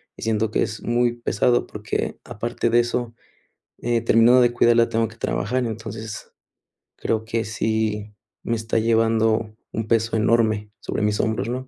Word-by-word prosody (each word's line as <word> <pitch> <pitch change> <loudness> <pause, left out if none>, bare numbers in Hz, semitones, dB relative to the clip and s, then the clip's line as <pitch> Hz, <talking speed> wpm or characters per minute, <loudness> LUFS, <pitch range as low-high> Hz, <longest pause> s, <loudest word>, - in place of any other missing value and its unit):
Y - - -13
siento 110 0 0
que - - +1
es 110 0 -5
muy 120 0 +1
pesado, 120 +1 +1
porque, - - -3
aparte 115 +2 -2
de 120 +1 +4
eso, 120 0 -1 0.7
eh, 120 -1 +1
terminando 115 +2 +5
de 120 -1 +4
cuidarla, 120 -1 +4
tengo 115 0 0
que 110 - -15
trabajar, 125 +3 -1
entonces, 110 -1 -7 0.6
creo 110 -1 -1
que 115 -1 -2
sí 110 -1 -2 0.3
me 115 - -1
está 110 0 -1
llevando 110 -1 +2 0.2
un 110 0 -3
peso 115 0 +1
enorme 110 -2 +1
sobre 105 - -3
mis 105 0 +1
hombros, 110 0 0
¿no? 130 +1 -4
115 Hz, 160 wpm, -23 LUFS, 110-120 Hz, 0.7 s, terminando